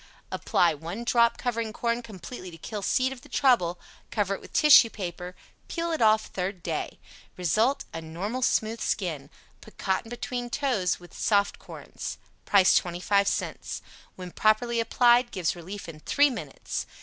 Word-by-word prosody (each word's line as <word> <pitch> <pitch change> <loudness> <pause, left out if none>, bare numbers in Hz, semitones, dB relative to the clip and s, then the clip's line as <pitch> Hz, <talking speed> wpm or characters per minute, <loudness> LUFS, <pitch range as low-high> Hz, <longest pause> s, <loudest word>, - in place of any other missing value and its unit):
APPLY 170 -2 +2
"One 170 +9 -6
Drop," 235 -1 +3
covering 230 -3 -2
corn 235 +1 -1
completely 215 -2 -9
to 165 - -11
kill 210 +5 -6
seed 255 +6 +1
of 250 - -13
the 290 - -16
trouble; 180 -11 +2 0.3
cover 200 -3 0
it - - -6
with - - -13
tissue 285 -6 +7
paper; 180 -3 -6 0.3
peel 335 0 -2
it 320 - -2
off 220 -1 +4
third 185 -1 -4
day. - - -3 0.4
RESULT 215 - +1
a 165 - -4
normal 190 +10 -4
smooth 225 -1 +1
skin. 155 -9 -2 0.3
Put 215 - -16
cotton 190 +4 -1
between 245 0 -4
toes 240 -10 0
when 175 0 -15
soft 200 -2 +1
corns. - - -8 0.3
PRICE 195 -2 +5
25 185 +3 +1
CENTS - - -3 0.3
When 180 -1 -8
Properly 230 +4 +2
Applied, 240 +1 +4
Gives 185 -7 -1
Relief 185 +3 -8
in 160 -2 -9
3 285 - +3
Minutes. - - -5
215 Hz, 160 wpm, -27 LUFS, 180-240 Hz, 0.4 s, tissue